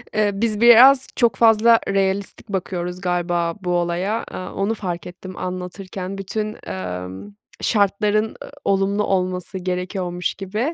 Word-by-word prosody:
Eee, 210 -1 +3
biz 215 +1 -1
biraz 255 +3 +8
çok 235 -5 +3
fazla 225 +1 +5
realistik 195 +2 -1
bakıyoruz 180 -2 -3
galiba 175 -2 0
bu 180 - -4
olaya, 175 +5 0
aaa, 185 - -6
onu 200 +3 0
fark 180 -5 -4
ettim 185 +1 -10
anlatırken. 185 +1 -5
Bütün, 210 +2 -4
ımm, 95 - -6 0.3
şartların, 210 +1 +2
ı - - -10 0.2
olumlu 200 +1 +1
olması 185 -1 -1
gerekiyormuş 180 -1 -3
gibi. 195 +2 -5
190 Hz, 130 wpm, -21 LUFS, 180-210 Hz, 0.3 s, biraz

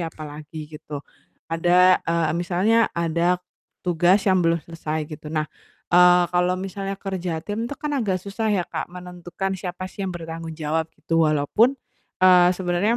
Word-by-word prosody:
apalagi 155 -1 -7
gitu, 150 -2 -8 0.5
ada 180 +2 +5
eee, 165 -2 +1
misalnya 185 +7 +2
ada, 170 +2 +1 0.5
tugas 180 +3 +3
yang 185 -2 +3
belum 165 -1 +2
selesai 155 -2 -4
gitu, 150 0 -8
nah, 155 -1 -1 0.5
eee, 180 0 +7
kalau 180 +1 +2
misalnya 195 +1 -4
kerja 180 -4 -4
tim 225 +3 -3
itu 285 - -5
kan 300 -1 -4
agak 220 -9 0
susah 215 +2 -2
ya 195 -4 +1
Kak, - - -5
menentukan 180 +1 -5
siapa 185 0 -5
sih - - -11
yang 185 - -4
bertanggung 165 -1 -7
jawab 160 +1 -1
gitu 165 -1 +1
walaupun, 210 - +2 0.5
eee, 180 -1 +7
sebenarnya 185 +5 +1
175 Hz, 155 wpm, -23 LUFS, 165-190 Hz, 0.5 s, eee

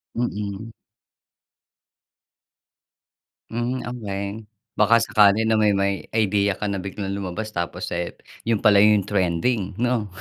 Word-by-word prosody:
Mm. 105 -2 -3 2.8
Mhm, 120 +3 -2
okey 100 -5 -4 0.5
baka 110 +2 +5
sakali 105 -1 +5
na 110 0 +2
may 105 -1 +4
may 100 0 +2 0.2
idea 100 -2 +2
ka - - -5
na 100 - -2
biglang 100 +1 -5
lumabas 100 +3 -4
tapos, 85 +1 -4
eh, 85 0 -3 0.3
yun 115 -3 +1
pala 105 -2 +6
yung 105 -1 +5
trending 95 +2 0
no? 120 -4 +1
105 Hz, 120 wpm, -23 LUFS, 100-110 Hz, 2.8 s, pala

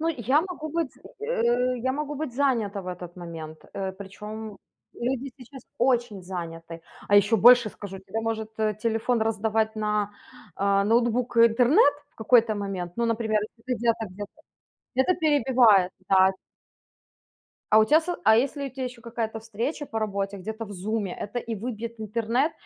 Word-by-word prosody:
Ну, 325 - 0
я 260 +1 +2
могу 335 -3 -6
быть 325 -2 -2
з - - -23 0.2
э, 250 - +1
я 260 +2 -1
могу 295 +1 -3
быть 290 -3 -4
занята 235 -7 0
в 185 - -12
этот 180 -1 -7
момент, 160 -3 -8
э. 190 -1 -3
Причём 210 +2 -8 0.4
люди 260 +2 -3
сейчас 260 0 -13
очень 240 -5 +1
заняты. 165 -2 -7 0.3
А 205 - +3
ещё 205 +3 +5
больше 240 0 +7
скажу: 195 -1 -9
тебе 220 +4 -5
может, 220 -1 -3
э, 215 -1 +1
телефон 230 +1 +1
раздавать 220 0 0
на, 210 -1 0 0.4
а, 200 0 +2
ноутбук 235 +2 +1
интернет 245 - +5 0.2
в - - -37
какой-то 225 0 +3
момент, 195 -4 -4
ну, 235 0 +1
например, 220 -2 +1
если 230 +3 -5
ты - - -7
где-то 230 -1 0
где-то 205 +1 -7 0.6
где-то 265 +8 +3
перебивает, 250 - +4 0.2
да. 190 0 +6 1.4
А 215 - +7
у 220 - +6
тя 305 +7 +5
со 345 +1 -3
а 220 +1 +6
если 280 +3 0
у - - -14
тя 260 +1 -5
еще 250 -1 -7
какая-то 225 -1 -4
встреча 230 +7 -4
по 225 - -3
работе, 200 -2 -2
где-то 220 +4 -5
в 205 - -9
"Зуме", 200 0 -3
это 210 +4 -5
и 230 -1 -4
выбьет 230 +1 -5
интернет, 230 +7 0
225 Hz, 170 wpm, -26 LUFS, 205-250 Hz, 1.4 s, больше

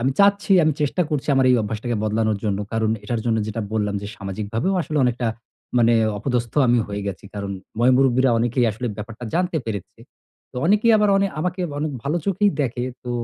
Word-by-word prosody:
আমি 130 +3 +1
চাচ্ছি, 200 0 +4
আমি 155 - +3
চেষ্টা 150 +5 +1
করছি 150 -2 -2
আমার 135 -1 +3
এই 125 - +5
অভ্যাসটাকে 110 +3 -3
বদলানোর 110 -1 0
জন্য, 100 -2 0
কারণ 110 -1 +1
এটার 120 -3 -2
জন্য 115 -1 +2
যেটা 110 +1 -3
বললাম 105 -2 0
যে 100 - -5
সামাজিকভাবেও 105 - -2
আসলে 155 -1 -2
অনেকটা 125 0 0 0.5
মানে 115 0 +4 0.2
অপদস্থ 120 -1 -2
আমি 120 0 +4
হয়ে 100 0 -4
গেছি। 100 -1 -5
কারণ 100 -1 -4 0.3
ময়-মুরুব্বিরা 130 +1 +4
অনেকেই 120 +2 +1
আসলে 115 +4 -5
ব্যাপারটা 110 +3 -8
জানতে 180 -1 +1
পেরেছে। 105 -5 -6 0.5
তো - - -11
অনেকেই 210 +5 +4
আবার 210 -1 +3
অনে 195 0 +3
আমাকে 180 +3 -2 0.2
অনেক 150 0 -2
ভালো 145 +4 -1
চোখেই 200 +1 +2
দেখে, 120 -1 -2 0.2
তো 125 - -4
120 Hz, 185 wpm, -22 LUFS, 110-150 Hz, 0.5 s, এই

